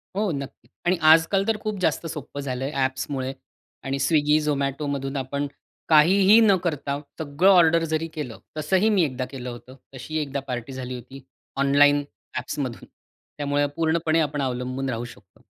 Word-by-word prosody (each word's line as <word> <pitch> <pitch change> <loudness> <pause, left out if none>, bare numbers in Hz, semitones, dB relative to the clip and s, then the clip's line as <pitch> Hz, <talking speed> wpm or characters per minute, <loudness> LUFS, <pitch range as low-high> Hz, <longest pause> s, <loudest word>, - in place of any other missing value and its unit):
हो, 205 -1 0
नक्कीच. 140 -5 -7 0.2
आणि 180 0 +2
आज-काल 165 +5 +4
तर 225 - +1
खूप 215 -2 -3
जास्त 165 -1 0
सोप्पं 150 -3 -7
झालंय 135 +1 -3
ॲप्समुळे 130 -1 -2 0.5
आणि 135 +1 -2
स्विग्गी, 150 +1 +3
झोमॅटोमधून 140 -1 -2
आपण 140 +2 -2 0.4
काहीही 190 +7 +6
न 205 -3 +5
करता, 145 -4 -2 0.2
सगळं 160 +5 +2
ऑर्डर 170 -3 +5
जरी 160 +1 0
केलं, 145 -8 -6 0.2
तसंही 185 +8 +2
मी 200 -5 +3
एकदा 130 -4 -2
केलं 125 -2 -6
होतं. 120 +2 -10 0.2
तशीही 155 +5 -4
एकदा 140 -1 -3
पार्टी 125 +1 -5
झाली 130 -1 -5
होती 130 +2 -11 0.3
ऑनलाइन 145 +1 +4 0.3
ॲप्समधून. 130 -5 -4 0.5
त्यामुळे 145 0 +1
पूर्णपणे 165 0 +1
आपण 150 -2 -1
अवलंबून 130 +1 -2
राहू 120 -1 -3
शकतो. 100 -6 -15
145 Hz, 150 wpm, -24 LUFS, 130-160 Hz, 0.5 s, काहीही